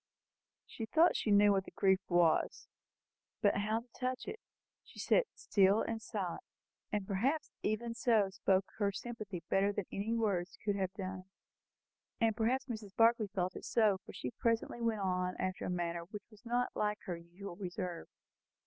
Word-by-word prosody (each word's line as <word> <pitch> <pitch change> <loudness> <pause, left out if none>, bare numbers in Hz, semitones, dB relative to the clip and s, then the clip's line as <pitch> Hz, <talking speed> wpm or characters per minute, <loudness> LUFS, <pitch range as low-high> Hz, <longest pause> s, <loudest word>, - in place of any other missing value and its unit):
She 225 - -6
thought 325 +9 +5
she - - -1
knew 205 0 +6
what 195 -1 +1
the - - -9
grief 190 -1 +3
was; 175 -3 +2 0.7
but 205 - +3
how 215 +3 0
to 240 - -21
touch 255 0 -2
it? 445 - -5 0.4
She - - -17
sat - - +3
still 200 +1 +3
and 225 -1 -3
silent, 200 -6 -3 0.5
and 210 -3 -1
perhaps 245 +11 0
even 230 +2 -1
so 225 -4 +3
spoke 190 0 +2
her 200 -1 +2
sympathy 210 -4 -6
better 195 +1 +3
than 205 -1 -3
any 215 +4 -1
words 200 -5 0
could 205 -1 +1
have 190 -2 -1
done 190 -2 -5
it. 185 - -13 0.9
And 225 -2 +3
perhaps 250 +4 +1
Mrs. 220 -6 -7
Barclay 230 -1 +4
felt 185 -2 -2
it - - -7
so, 210 -4 +3
for - - -10
she 125 - -5
presently 230 - 0
went 225 -3 0
on 180 -1 0
after 185 0 -2
a - - -2
manner 170 -1 -2
which 205 +3 -9
was 210 -1 -18
not 245 +1 +1
like 210 0 0
her 180 -4 -3
usual 175 +3 -9
reserve. 180 -2 -5
205 Hz, 175 wpm, -34 LUFS, 185-225 Hz, 0.9 s, knew